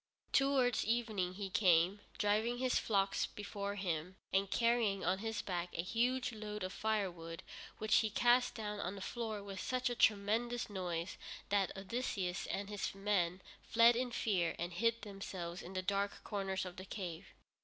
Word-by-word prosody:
Towards 270 -4 +4
evening 215 -6 0
he 195 -1 -4
came, 185 -1 +4 0.2
driving 215 +4 +2
his 255 0 +2
flocks 195 -2 +1
before 200 -1 -4
him, 180 -2 -2 0.2
and 195 0 +3
carrying 230 -4 +2
on 185 +2 +2
his 225 0 -2
back 175 -2 -2
a 170 - 0
huge 245 +6 +1
load 210 -1 -5
of 185 +1 -3
firewood, 180 -7 -2 0.3
which 215 0 +3
he 220 - +3
cast 245 +3 +3
down 210 -2 -4
on 190 0 -3
the 195 - -8
floor 220 -1 -3
with 195 -1 -6
such 255 -1 0
a - - -2
thunderous 225 +3 +2
noise 175 -2 -3 0.3
that 200 -2 +2
Odysseus 195 -3 -2
and 200 0 -2
his 205 -1 -3
men 190 -3 0 0.2
fled 230 +1 +6
in 250 +1 0
fear 185 -8 +1
and 175 +1 -3
hid 230 +5 +1
themselves 190 -3 -5
in 180 - -9
the 185 0 -2
darkest 200 +1 -1
corners 195 -2 -2
of 180 -1 -8
the 185 - -7
cave. 185 -3 -6
200 Hz, 165 wpm, -36 LUFS, 185-225 Hz, 0.3 s, fled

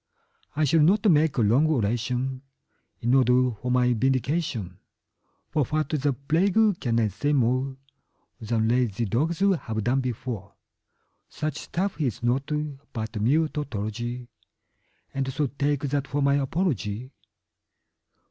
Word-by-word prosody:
I 155 - +1
shall 155 +3 +3
not 190 +8 +4
make 150 -2 +3
a - - +3
long 120 +9 +4
oration 125 0 -1 0.6
in 120 +2 +1
order 125 -1 +4
for 115 +3 -6
my 125 0 +3
vindication, 130 - -1 0.7
For 150 - +2
what 155 +2 -1
the 145 -2 +1
plague 160 - +1 0.2
can 115 -2 0
I 110 -2 +2
say 145 +9 -1
more 130 +1 +1 0.6
Than 110 -1 0
lazy 120 -2 +1
dogs 155 - -1
have 130 - +1
done 130 +5 +1
before; 115 -5 -5 0.7
Such 155 -2 -3
stuff 185 -1 -3
is 125 -6 -2
naught 130 +4 0 0.4
but 110 -3 -4
mere 150 +8 +3
tautology, 120 -3 -4 0.9
And 135 -1 -2
so 145 +3 0
take 140 +1 -1
that 140 -1 -1
for 145 +2 -1
my 140 0 +4
apology. 135 - -1
130 Hz, 130 wpm, -26 LUFS, 120-145 Hz, 0.9 s, not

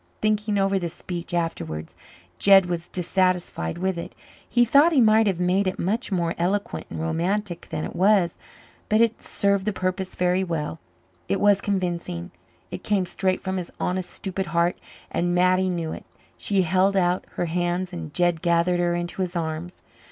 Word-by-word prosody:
Thinking 210 -1 +1
over 195 0 +2
this 175 -1 -4
speech 175 0 -6
afterwards 85 - -3 0.4
Jed 195 -2 +7
was 175 -1 -3
dissatisfied 180 - 0
with 185 -1 -1
it. - - -8 0.3
He 240 0 +4
thought 285 +8 +5
he 285 - +4
might 220 -1 +5
have 190 -3 0
made 185 +2 +2
it 185 - -1
much 215 +6 -1
more 170 -3 0
eloquent 195 +4 -1
and - - -6
romantic 175 +3 -2
than 155 - -3
it - - -7
was. 190 -2 +3 0.5
But 215 - +3
it 230 -1 +2
served 200 0 0
the - - +3
purpose 185 0 -2
very 180 +1 +1
well. 165 -3 -3 0.5
It 195 - +1
was 205 -1 +4
convincing 175 - -2 0.4
it - - -6
came 200 -3 +1
straight 185 +1 -1
from 190 0 -2
his 180 -2 -4
honest, 180 0 -1
stupid 190 -1 -4
heart, 170 +1 +1 0.4
and 175 0 0
Mattie 185 +1 +3
knew 170 -3 -2
it. - - -8 0.3
She 195 -2 +1
held 190 +3 +2
out 180 -1 +2
her - - -1
hands 175 +2 -1
and 165 -3 -6
Jed 175 0 +1
gathered 170 +1 +2
her 175 0 +1
into 175 +2 -3
his 180 -1 -2
arms. 165 +1 -4
180 Hz, 175 wpm, -24 LUFS, 170-195 Hz, 0.5 s, Jed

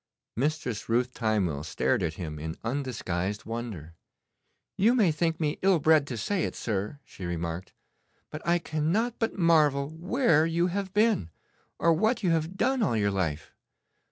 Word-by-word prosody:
Mistress 130 -5 -2
Ruth 125 +2 +1
Timewell 100 - 0
stared 80 - 0
at 80 0 -1
him 75 -4 -6
in 80 +2 -5
undisguised 110 -7 -3
wonder. 110 -9 -6 0.8
'You 225 +6 +4
may 205 -9 +4
think 160 +1 -1
me 150 -2 -1
ill 190 -1 +4
bred 155 -1 +4
to 125 - -4
say 180 - -1
it, - - -5
sir,' 105 +4 -3
she - - -11
remarked, 85 +1 -4 0.6
'but 155 - -6
I 170 +1 +3
cannot 170 +9 -1
but 225 -2 -1
marvel 150 -5 +3
where 165 - +2
you 170 +1 +1
have 195 -1 -2
been, 210 - +2 0.5
or 170 - +4
what 220 +8 +1
you 180 - +3
have 165 +3 -1
done 265 +3 +1
all 140 - +2
your 100 -1 +1
life. 80 -6 -2
145 Hz, 160 wpm, -28 LUFS, -, 0.8 s, You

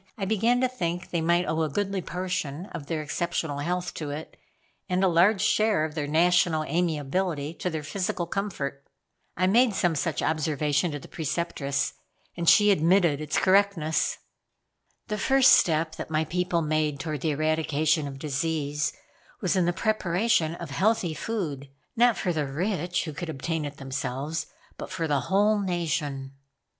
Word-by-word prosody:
I 195 - -2
began 225 +5 +2
to 255 - +3
think 180 -8 -4
they 170 - 0
might 170 +2 +2
owe 160 0 -1
a 155 - 0
goodly 195 +5 -1
portion 180 -3 -3
of 140 - -7
their 160 -2 -2
exceptional 160 -2 -2
health 180 +4 -2
to 150 -2 -5
it, 150 +2 -7 0.5
and 185 +1 +1
a - - +5
large 185 +4 +4
share 215 -7 +3
of 155 - -6
their 150 -2 -3
national 165 0 +3
amiability 160 0 -1
to 180 - -1
their 160 -3 -4
physical 180 +1 -2
comfort. 170 -8 -4 0.5
I 185 - +2
made 225 +3 +4
some 175 -3 +2
such 160 +1 -1
observation 150 0 +1
to 145 - -4
the - - -12
Preceptress, 155 -3 -2 0.4
and 170 -1 +2
she 210 -1 +6
admitted 170 -3 +3
its 155 0 -2
correctness. 190 -5 +2 0.9
"The 210 -2 -3
first 270 -1 +5
step 160 -1 +4
that - - -6
my 160 0 +1
people 180 0 0
made 155 -2 0
toward 155 -3 -4
the 160 - 0
eradication 155 0 +1
of 135 -1 -7
disease 150 0 -1 0.5
was 185 0 0
in 185 -2 +3
the 175 - +2
preparation 185 -3 +1
of 170 -4 -8
healthy 195 +1 +1
food; 155 -10 -4 0.3
not 240 -1 +4
for 180 - -1
the 150 -3 -1
rich, 175 +4 -1
who 155 - -5
could 165 +3 -5
obtain 160 +1 -3
it 145 0 -7
themselves, 140 +3 -3 0.3
but - - -6
for 165 - -2
the 145 -2 +2
whole 205 +2 +3
nation." 150 -7 -2
165 Hz, 165 wpm, -26 LUFS, 150-185 Hz, 0.9 s, she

